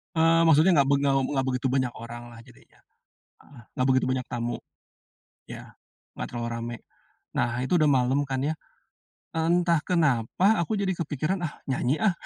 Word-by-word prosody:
Eee, 165 +1 +4
maksudnya 160 +3 +5
nggak 140 -1 +4
beg 140 - +3
nggak 140 -1 +2 0.2
nggak 135 -1 0
begitu 125 0 -1
banyak 130 -2 +1
orang 120 +1 -9
lah 115 - -13
jadinya, - - -21 0.7
heeh, 125 -5 -16
nggak 130 - 0
begitu 130 0 +2
banyak 130 -1 -1
tamu. 120 0 -2 0.9
Iya, - - -10 0.4
nggak - - -5
terlalu 120 -1 -4
rame. 115 +1 -5 0.6
Nah 120 - +1
itu 130 - -4
udah 155 - +4
malem 130 +3 +2
kan 130 -1 -1
ya, 160 - -1 0.8
entah 170 0 +2
kenapa 150 - +1 0.2
aku 170 - -2
jadi 190 -1 0
kepikiran, 155 +4 -2
"Ah - - -8 0.2
nyanyi 130 +2 0
ah, 215 -4 +3
135 Hz, 165 wpm, -26 LUFS, 125-160 Hz, 0.9 s, maksudnya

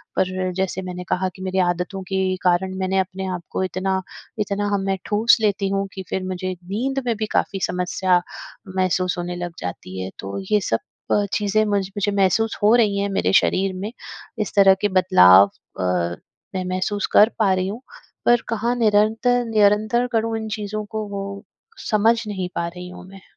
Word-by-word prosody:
पर 185 0 0
जैसे 190 0 -2
मैंने 180 -1 -6
कहा 185 +1 0
कि 190 - -12
मेरी 190 0 -1
आदतों 180 +2 -2
के 190 -1 +1
कारण 185 +1 +1
मैंने 190 0 +1
अपने 190 0 -3
आप 175 - -6
को - - -1
इतना 190 +1 -1 0.4
इतना 205 0 -1
हम 200 - +1
में 195 0 0
ठूँस 220 +3 +4
लेती 200 -2 +1
हूँ 195 0 -1
कि 190 - -6
फिर 190 - -2
मुझे 185 0 -3
नींद 255 +9 -2
में 235 -2 +1
भी 215 - -1
काफ़ी 195 - 0
समस्या 180 0 +1 0.5
महसूस 185 -1 +1
होने 175 0 -4
लग 175 -1 -5
जाती 90 +1 -6
है, 95 - -4
तो 100 - -5
ये 210 - +5
सब 115 - 0 0.3
अ, 205 - +3
चीज़ें 210 +1 +2
मुझ 205 -1 +1 0.2
मुझे 205 0 +1
महसूस 200 +3 +2
हो 210 +2 +5
रही 210 -4 +3
हैं 200 0 0
मेरे 195 - 0
शरीर 190 0 +3
में, 200 +4 -5 0.5
इस 215 - -2
तरह 195 -1 +7
के 205 - +3
बदलाव 140 - +7 0.3
अ, - - -1 0.7
मैं 185 - -1
महसूस 190 +2 -1
कर 215 - +7
पा 200 -3 +4
रही 185 0 0
हूँ, 220 +6 -5 0.4
पर 240 0 +5
कहाँ 230 +2 0
निरंतर 225 +2 +2
निरंतर 215 +3 +3
करूँ 225 0 0
इन 220 - -5
चीज़ों 210 0 -4
को? 215 +1 -4
वो 200 0 -6 0.5
समझ 225 +2 +3
नहीं 190 -3 -3
पा 170 - -1
रही 180 +1 -8
हूँ 180 - -11
मैं। 195 0 -13
195 Hz, 190 wpm, -22 LUFS, 185-210 Hz, 0.7 s, तरह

